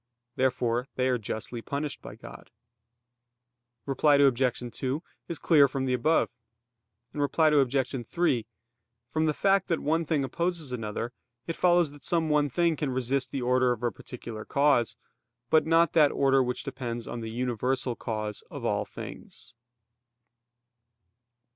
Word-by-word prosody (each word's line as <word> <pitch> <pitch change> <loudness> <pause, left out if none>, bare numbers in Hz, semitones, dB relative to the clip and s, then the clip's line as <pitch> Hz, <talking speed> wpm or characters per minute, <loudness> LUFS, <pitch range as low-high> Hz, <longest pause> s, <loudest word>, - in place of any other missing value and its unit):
Therefore 125 -1 0
they 130 0 +1
are 125 -1 +1
justly 115 +2 -5
punished 140 +4 -4
by - - -9
God. - - -12 1.4
Reply 145 +2 +3
Obj. 130 -3 +2
2 135 +5 -2 0.2
is 170 - -3
clear 145 -4 +5
from 135 0 -3
the 130 - 0
above. 155 +7 +2 0.8
Reply 150 +2 +2
Obj. 135 -4 +1
3: 130 -11 +1 0.6
From 155 0 +1
the 155 - +2
fact 195 -1 +2
that 165 - 0
one 160 +3 +1
thing 150 -2 0
opposes 165 +1 -2
another, 115 0 -4 0.3
it 165 - -3
follows 175 -4 +3
that 145 -1 -14
some 165 0 0
one 150 -1 +3
thing 170 +4 +2
can 145 -1 -2
resist 130 +1 -1
the 130 0 -3
order 125 0 +3
of 120 -1 -3
a 120 - +1
particular 115 0 -8
cause; 140 -2 +2 0.5
but 155 0 +4
not 165 0 +4
that 150 -3 +5
order 135 -1 +3
which 125 -1 -2
depends 120 -4 -5
on 120 - -5
the 110 - -5
universal 125 +1 -1
cause 110 -3 -4
of - - -7
all - - 0
things. - - -10
135 Hz, 150 wpm, -28 LUFS, 125-155 Hz, 1.4 s, clear